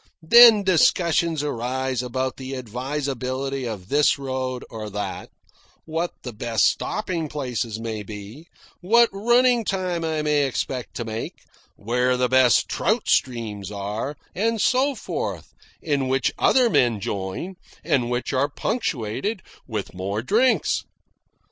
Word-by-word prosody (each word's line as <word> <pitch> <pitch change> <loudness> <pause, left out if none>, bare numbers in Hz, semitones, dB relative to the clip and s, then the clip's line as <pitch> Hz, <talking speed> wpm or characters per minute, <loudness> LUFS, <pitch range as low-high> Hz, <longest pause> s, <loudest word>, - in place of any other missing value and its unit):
Then 230 +3 +8
discussions 170 -3 +2
arise 130 -1 -2
about 130 +1 -3
the 130 0 -6
advisability 130 +1 -3
of 100 -4 -7
this 145 +1 +3
road 130 -2 -4
or 110 -2 -6
that, 105 0 -5 0.6
what 165 +2 -2
the 125 - -6
best 115 +1 +1
stopping 170 -7 -1
places 125 -6 -3
may 110 -2 -4
be, 105 - -10 0.3
what 235 +6 +4
running 240 +3 +3
time 185 -4 -2
I 160 -1 -1
may 150 -2 +2
expect 125 -1 -4
to 120 - -4
make, 110 0 -6 0.3
where 125 +4 0
the 125 0 +1
best 130 -1 +4
trout 215 +5 0
streams 110 -6 0
are, 105 +7 -4 0.2
and 225 +4 0
so 265 +6 +2
forth, - - -5 0.3
in 140 -4 0
which 135 +1 +1
other 255 -2 +4
men 120 - +2
join, 100 - -4 0.3
and 125 -4 +1
which 125 +2 -2
are 135 +2 +1
punctuated 170 - -2 0.2
with 110 -5 -4
more 100 +4 -3
drinks. 235 - +2
130 Hz, 130 wpm, -23 LUFS, 115-170 Hz, 0.6 s, Then